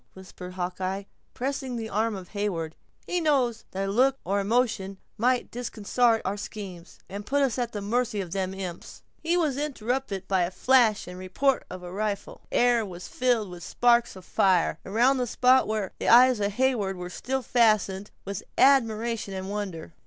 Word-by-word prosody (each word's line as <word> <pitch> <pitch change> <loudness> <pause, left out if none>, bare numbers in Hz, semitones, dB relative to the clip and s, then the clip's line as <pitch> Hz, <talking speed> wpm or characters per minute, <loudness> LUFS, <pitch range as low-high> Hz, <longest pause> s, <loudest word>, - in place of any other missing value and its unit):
whispered 185 -1 -10
Hawkeye, 185 +2 -3 0.3
pressing 265 -1 -3
the 225 -1 -4
arm 220 +1 0
of 185 -2 -9
Heyward; 180 -6 -3 0.3
"he 360 -1 -1
knows 260 -7 +1
that 195 +1 -3
a - - -1
look 260 +5 +3
or 200 +2 +1
a - - -1
motion 210 -3 0 0.2
might 250 +3 +1
disconsart 235 0 +1
our 195 +2 -1
schemes, 200 -5 -8
and 200 +2 -6
put 280 +6 +1
us 260 -2 0
at 240 -1 -1
the 205 - -5
mercy 230 0 0
of 180 -4 -4
them 190 0 -1
imps—" 185 -3 -7 0.2
He 340 +2 +1
was 305 -6 +1
interrupted 250 -8 -3
by 190 -3 +2
the - - -3
flash 235 +1 +3
and 180 0 -8
report 255 +9 0
of 185 0 -8
a 175 0 -8
rifle. 205 0 -3
The - - -1
air 240 -1 +4
was 180 -3 -8
filled 240 -6 0
with 175 -1 -9
sparks 240 +2 +2
of 185 -1 -12
fire, 180 -4 +2
around 245 +7 +3
that 250 -1 -1
spot 255 +3 +4
where 215 -3 -2
the - - 0
eyes 250 0 +7
of 200 0 -1
Heyward 220 -6 0
were 180 0 -6
still 265 +5 -3
fastened, 215 -4 +2 0.2
with 200 -1 -4 0.2
admiration 230 -6 +3
and 190 +1 -5
wonder. 190 -6 -5
215 Hz, 185 wpm, -26 LUFS, 190-245 Hz, 0.3 s, eyes